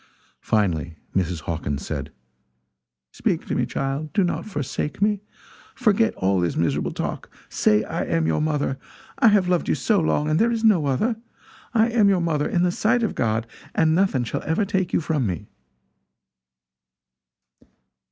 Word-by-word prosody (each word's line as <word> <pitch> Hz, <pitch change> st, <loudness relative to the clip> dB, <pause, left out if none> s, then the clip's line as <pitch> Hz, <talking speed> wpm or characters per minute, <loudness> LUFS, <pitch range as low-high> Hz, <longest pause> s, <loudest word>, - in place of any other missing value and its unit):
Finally 85 Hz, -7 st, 0 dB, 0.2 s
Mrs. 90 Hz, -3 st, 0 dB
Hawkins 75 Hz, -3 st, -3 dB
said: -, -, -4 dB, 1.0 s
"Speak -, -, -1 dB
to -, -, -3 dB
me, -, -, 0 dB
child 140 Hz, +3 st, -3 dB
do 200 Hz, -, +3 dB
not 175 Hz, -, -2 dB
forsake 150 Hz, -4 st, -3 dB
me. 205 Hz, 0 st, +1 dB, 0.5 s
Forget 225 Hz, -2 st, +2 dB
all 95 Hz, 0 st, +1 dB
this 85 Hz, -1 st, 0 dB
miserable 85 Hz, -, 0 dB
talk. -, -, -4 dB, 0.2 s
Say 105 Hz, 0 st, +2 dB
I -, -, -3 dB
am 80 Hz, -1 st, 0 dB
your 80 Hz, -1 st, +1 dB
mother! 150 Hz, -3 st, -1 dB, 0.4 s
I -, -, +6 dB
have 205 Hz, -4 st, +4 dB
loved 180 Hz, -1 st, +1 dB
you -, -, +3 dB
so 215 Hz, -3 st, +2 dB
long, 150 Hz, -2 st, +1 dB
and 155 Hz, +2 st, +2 dB
there 230 Hz, -, +4 dB
is 230 Hz, -1 st, -2 dB
no 190 Hz, -10 st, +4 dB
other. 215 Hz, -, 0 dB, 0.6 s
I 225 Hz, +1 st, +4 dB
am 225 Hz, -4 st, +4 dB
your 190 Hz, -2 st, +3 dB
mother, 155 Hz, -4 st, 0 dB
in 175 Hz, -, +1 dB
the 180 Hz, -, +2 dB
sight 235 Hz, +6 st, +1 dB
of 220 Hz, -, 0 dB
God, 110 Hz, -1 st, 0 dB, 0.3 s
and 160 Hz, -1 st, +3 dB
nothing 170 Hz, -8 st, +2 dB
shall 115 Hz, -, -3 dB
ever 160 Hz, +7 st, 0 dB
take 190 Hz, -2 st, -1 dB
you -, -, +1 dB
from 150 Hz, -7 st, 0 dB
me!" 90 Hz, -4 st, -5 dB
155 Hz, 165 wpm, -23 LUFS, -, 1.0 s, I